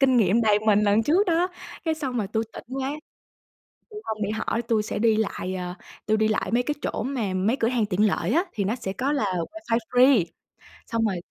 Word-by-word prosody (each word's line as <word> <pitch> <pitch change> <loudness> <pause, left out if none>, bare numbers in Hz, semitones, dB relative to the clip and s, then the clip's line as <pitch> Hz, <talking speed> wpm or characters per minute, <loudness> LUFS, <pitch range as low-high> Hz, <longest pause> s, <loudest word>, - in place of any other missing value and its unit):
kinh 265 -2 +4
nghiệm 220 0 +4
đầy 210 -1 +4
mình 210 -1 +5
lần 210 +2 +3
trước 355 - +3
đó. 345 +1 +2 0.4
Cái 320 - +1
xong 275 -5 -4
rồi 205 - -1
tui 220 +2 -1
tỉnh - - -9 0.2
quá 265 +1 -1 1.0
tui 425 - -8
hông 215 -1 -4
đi 200 - 0
hỏi 220 +2 -1
tui 225 -2 +1
sẽ 210 - -4
đi 225 0 +3
lại, 190 -3 -2
ờ, 180 -1 -4 0.3
tui 215 - +3
đi 220 0 +2
lại 215 -3 -1
mấy 245 +1 +3
cái 295 - -2
chỗ - - -2
mà 235 -8 -2
mấy 205 +7 +1
cửa 230 -3 +1
hàng 240 -4 +1
tiện 205 +2 +2
lợi - - 0
á 340 +5 +3
thì 200 - -2
nó 205 +4 0
sẽ 195 -6 -4
có 270 +6 -1
là 280 - 0 0.3
wifi 320 -9 -1
free. 250 -5 +5 0.6
Xong 230 -1 0
rồi, 200 -4 0
225 Hz, 235 wpm, -25 LUFS, 210-265 Hz, 1.0 s, mình